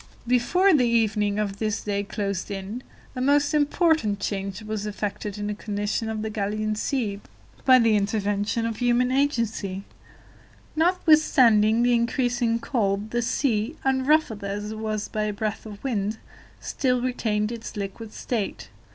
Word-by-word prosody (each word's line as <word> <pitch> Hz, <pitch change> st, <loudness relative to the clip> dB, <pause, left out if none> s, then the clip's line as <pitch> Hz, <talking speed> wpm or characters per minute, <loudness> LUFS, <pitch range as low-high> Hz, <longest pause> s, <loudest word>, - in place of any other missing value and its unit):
Before 250 Hz, +11 st, +3 dB
the 255 Hz, -5 st, +4 dB
evening 210 Hz, -3 st, +1 dB
of 205 Hz, -2 st, -2 dB
this 215 Hz, -1 st, -1 dB
day 200 Hz, -1 st, -1 dB
closed 200 Hz, -2 st, -3 dB
in, 200 Hz, +4 st, -5 dB, 0.3 s
a 255 Hz, -, -3 dB
most 285 Hz, +3 st, +3 dB
important 300 Hz, -, +2 dB
change 195 Hz, 0 st, -3 dB
was 215 Hz, -1 st, -4 dB
effected 210 Hz, 0 st, -4 dB
in 205 Hz, -, -4 dB
the 210 Hz, -, -2 dB
condition 205 Hz, +1 st, -3 dB
of 215 Hz, -1 st, -3 dB
the 220 Hz, -, -3 dB
Gallian 215 Hz, +1 st, -2 dB
Sea 210 Hz, -3 st, -2 dB, 0.4 s
by 260 Hz, -1 st, +8 dB
the 230 Hz, -3 st, +4 dB
intervention 205 Hz, +2 st, 0 dB
of 225 Hz, -2 st, -3 dB
human 245 Hz, +1 st, +2 dB
agency. 230 Hz, -8 st, 0 dB, 0.9 s
Notwithstanding 275 Hz, -, +4 dB
the 245 Hz, 0 st, +3 dB
increasing 240 Hz, 0 st, +1 dB
cold, 215 Hz, -4 st, -1 dB
the 240 Hz, -, 0 dB
sea, 235 Hz, +1 st, 0 dB
unruffled 265 Hz, -4 st, +2 dB
as 205 Hz, +1 st, -4 dB
it 220 Hz, -, -6 dB
was 215 Hz, -1 st, -2 dB
by 215 Hz, 0 st, -2 dB
a 210 Hz, -, -2 dB
breath 215 Hz, +1 st, -4 dB
of 205 Hz, -1 st, -10 dB
wind, 215 Hz, -5 st, -1 dB, 0.4 s
still 250 Hz, -2 st, 0 dB
retained 225 Hz, -4 st, -1 dB
its 230 Hz, -2 st, -7 dB
liquid 205 Hz, +2 st, -6 dB
state. 215 Hz, -, -4 dB
220 Hz, 150 wpm, -25 LUFS, 205-245 Hz, 0.9 s, by